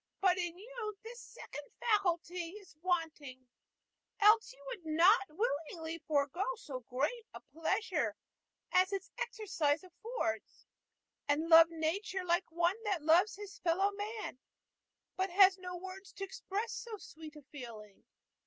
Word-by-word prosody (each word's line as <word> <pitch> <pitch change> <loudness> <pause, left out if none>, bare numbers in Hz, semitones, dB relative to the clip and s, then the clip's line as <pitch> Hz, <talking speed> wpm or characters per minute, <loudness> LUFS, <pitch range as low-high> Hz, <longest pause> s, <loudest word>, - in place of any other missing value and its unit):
But 370 -2 +3
in 350 -1 -2
you 430 0 -6
this 470 +1 -9
second 295 - -9 0.2
faculty 360 -5 0
is 400 -6 -13
wanting, 310 -8 -2 0.7
else 430 +2 +6
you - - -16
would - - -6
not 345 +7 +5
willingly 325 -2 -2
forego 290 +4 +1
so 280 - -7
great 275 - -2
a - - -6
pleasure 330 - -1 0.6
as 370 +1 +4
its 390 0 -4
exercise 325 -8 0
affords, 365 - -4 0.6
and 305 +3 +1
love 330 0 +9
nature 355 +4 -2
like 345 0 +1
one 345 +6 +1
that 385 -7 0
loves 350 +7 +5
his 410 -1 -9
fellow 370 +4 +2
man, 415 - -5 0.8
but 380 +1 +1
has 380 +1 +6
no 360 -1 -5
words 375 +1 -9
to 390 - -6
express 400 +3 -3
so 455 -2 -6
sweet 315 -4 -11
a 300 - -12
feeling. 230 -8 -10
360 Hz, 135 wpm, -34 LUFS, 315-405 Hz, 0.8 s, love